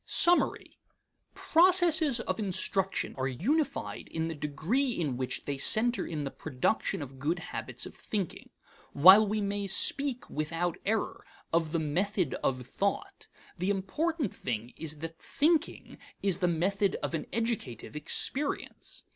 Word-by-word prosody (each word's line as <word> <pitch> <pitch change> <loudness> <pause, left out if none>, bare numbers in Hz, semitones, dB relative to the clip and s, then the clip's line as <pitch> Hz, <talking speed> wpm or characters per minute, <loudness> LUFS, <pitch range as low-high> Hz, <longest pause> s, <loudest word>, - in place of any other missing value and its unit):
Summary. 350 +1 +2 0.6
Processes 330 -6 +4
of - - -3
instruction 195 -1 0
are 130 - 0
unified 265 - -1
in 160 0 -2
the - - -3
degree 165 - -1
in 145 -7 -1
which 130 0 -3
they 140 -1 -3
center 235 - +3
in 155 -3 -4
the 135 - -4
production 160 +5 -1
of 135 -1 -11
good 155 +6 0
habits 175 - -4
of - - -9
thinking. 200 -6 -5 0.4
While 190 +8 +8
we 215 +1 -1
may 200 0 -2
speak, 260 +6 0
without 165 +3 -2
error, 220 +1 -1 0.3
of 165 -2 +1
the 170 - 0
method 180 +5 -1
of 130 -2 -1
thought, 200 - -3 0.3
the 185 +3 0
important 255 - -1
thing 120 -1 -4
is 155 -1 -3
that 165 0 -6
thinking 310 +2 0 0.2
is 195 -3 +1
the 180 - +2
method 190 +4 +1
of - - -2
an 160 - -3
educative 225 - -3
experience. 265 - 0
190 Hz, 140 wpm, -30 LUFS, 155-235 Hz, 0.6 s, While